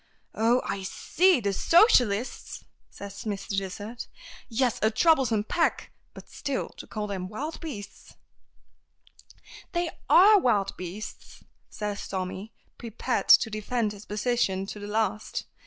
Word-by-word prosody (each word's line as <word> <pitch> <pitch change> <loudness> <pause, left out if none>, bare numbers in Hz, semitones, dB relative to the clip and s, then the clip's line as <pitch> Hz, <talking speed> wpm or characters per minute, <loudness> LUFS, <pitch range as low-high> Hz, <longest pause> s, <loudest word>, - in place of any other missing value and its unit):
"Oh, 235 +3 +2
I 195 0 -3
see! 345 - +2
The 200 -3 -1
socialists!" 250 - +3 0.2
says 200 0 -9
Mr. 200 -1 -3
Dysart. 205 +5 -5 0.4
"Yes; 245 0 0
a 220 - +4
troublesome 240 -4 +3
pack! 330 +9 0 0.2
But - - -12
still, 280 -3 -3
to - - -10
call 215 -1 -4
them 190 -3 -4
wild 295 +10 -5
beasts 225 -11 -9 0.8
" - - -20
"They 345 -1 -1 0.2
are 410 +3 +8
wild 210 - +1
beasts," 185 +4 -8 0.3
says 210 -1 -5
Tommy, 190 +3 -5 0.3
prepared 235 +2 -3
to 225 - +7
defend 215 +1 -1
his 205 0 -11
position 210 -3 0
to 205 - -7
the 205 - -7
last. 215 0 -2
215 Hz, 130 wpm, -27 LUFS, 200-250 Hz, 0.8 s, are